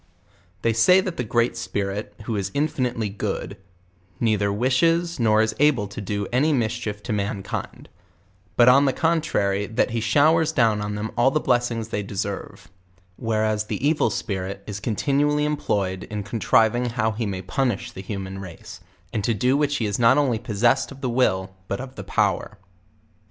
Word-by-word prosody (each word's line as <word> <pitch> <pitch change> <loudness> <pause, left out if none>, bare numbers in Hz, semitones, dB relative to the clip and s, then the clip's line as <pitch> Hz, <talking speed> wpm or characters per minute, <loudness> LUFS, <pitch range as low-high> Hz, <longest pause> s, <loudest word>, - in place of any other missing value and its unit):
They 115 - +2
say 150 - +5
that 185 -2 -3
the 125 - -1
Great 120 +1 +1
Spirit, 100 -3 -4
who 110 +1 -3
is 100 -1 -2
infinitely 125 -6 0
good, 100 0 -4 0.6
neither 105 -3 +1
wishes 165 +10 +1
nor 110 -2 +4
is 110 0 -1
able 140 -8 +3
to 105 +2 -7
do 100 0 -2
any 150 +5 +3
mischief 110 -4 -2
to 115 - -3
mankind; 100 -1 -4 0.7
but 120 - +5
on 135 +3 +7
the 135 - +2
contrary, 105 - 0
that 110 - 0
he 115 - -1
showers 155 +7 +3
down 115 -7 +2
on 105 0 -3
them 105 +2 -4
all 120 +2 +4
the 155 - +1
blessings 120 -4 0
they 105 - -2
deserve; 100 0 -5 0.5
whereas 110 -1 0
the 135 - -1
evil 155 0 +2
spirit 100 -2 -4
is 105 -1 -5
continually 145 +7 +1
employed 100 -11 -1
in 105 -1 -5
contriving 115 +3 +2
how 115 -2 0
he 110 +1 -3
may 95 -2 -4
punish 120 +4 -1
the 95 - -8
human 95 -1 -6
race; 90 -4 -10 0.3
and 105 - -1
to 115 +2 +1
do 125 +6 +2
which 145 0 +1
he 115 - -1
is 105 +1 -2
not 120 +3 +5
only 130 -6 +2
possessed 120 +4 +1
of 135 0 -11
the 130 -3 -1
will, 95 -7 +1
but 100 - -3
of 130 0 -7
the - - -8
power. 105 -1 0
115 Hz, 175 wpm, -23 LUFS, 105-130 Hz, 0.7 s, on